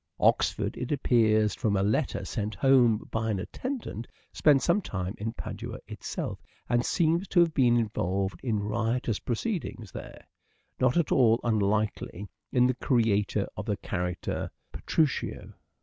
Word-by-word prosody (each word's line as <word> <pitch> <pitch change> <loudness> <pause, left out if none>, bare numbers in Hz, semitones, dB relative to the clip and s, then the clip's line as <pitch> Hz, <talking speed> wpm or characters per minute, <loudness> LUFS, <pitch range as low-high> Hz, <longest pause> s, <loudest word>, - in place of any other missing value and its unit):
Oxford, - - +2
it 125 - -4
appears 110 -7 +3
from 110 -5 0
a 95 - +2
letter 105 -3 0
sent 105 +3 -3
home 125 -5 +4
by 115 0 -1
an 105 - 0
attendant, 225 - -5 0.3
spent 140 -4 +4
some 205 - +3
time 95 - -4
in 110 +2 -2
Padua - - -6
itself, - - -5 0.3
and 120 0 +2
seems 170 +5 +1
to 180 - +2
have 170 -2 +4
been 120 -4 +4
involved 95 -4 -1
in 110 -5 -1
riotous 115 +1 -1
proceedings 120 - -3
there: - - -9 0.5
not 130 +4 +3
at 170 - +1
all 115 -3 +5
unlikely 105 -2 0 0.2
in 125 -1 +4
the 130 - +3
creator 115 -5 +1
of - - -6
the - - 0
character 90 0 -3
" - - -47
Petruchio." 155 -4 -1
115 Hz, 150 wpm, -28 LUFS, 105-130 Hz, 0.5 s, all